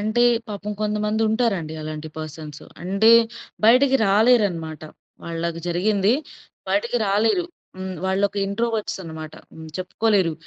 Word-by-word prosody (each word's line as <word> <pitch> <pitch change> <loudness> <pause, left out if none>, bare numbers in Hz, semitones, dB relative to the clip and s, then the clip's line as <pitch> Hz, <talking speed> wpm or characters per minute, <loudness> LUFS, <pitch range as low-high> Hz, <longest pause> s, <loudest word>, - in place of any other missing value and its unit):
అంటే 215 +3 +1 0.3
పాపం 205 0 -5
కొంతమందుంటారండి 210 -4 0
అలాంటి 155 0 -6
పర్సన్స్. 155 -1 -8 0.2
అంటే 195 +5 +3 0.6
బయటకి 260 +4 +6
రాలేరనమాట. 195 - +2 0.4
వాళ్ళకి 165 0 -3
జరిగింది 200 +4 +2 0.6
బయటకి 205 +5 0
రాలేరు. 220 - +2 0.3
హ్మ్. 185 0 -5
వాళ్ళొక 195 +1 +1
ఇంట్రోవర్ట్స్ 220 +1 -2
అన్నమాట. 160 -2 -8 0.2
హ్మ్. 160 0 -10
చెప్పుకోలేరు. 190 -1 +1
200 Hz, 105 wpm, -22 LUFS, 165-220 Hz, 0.6 s, బయటకి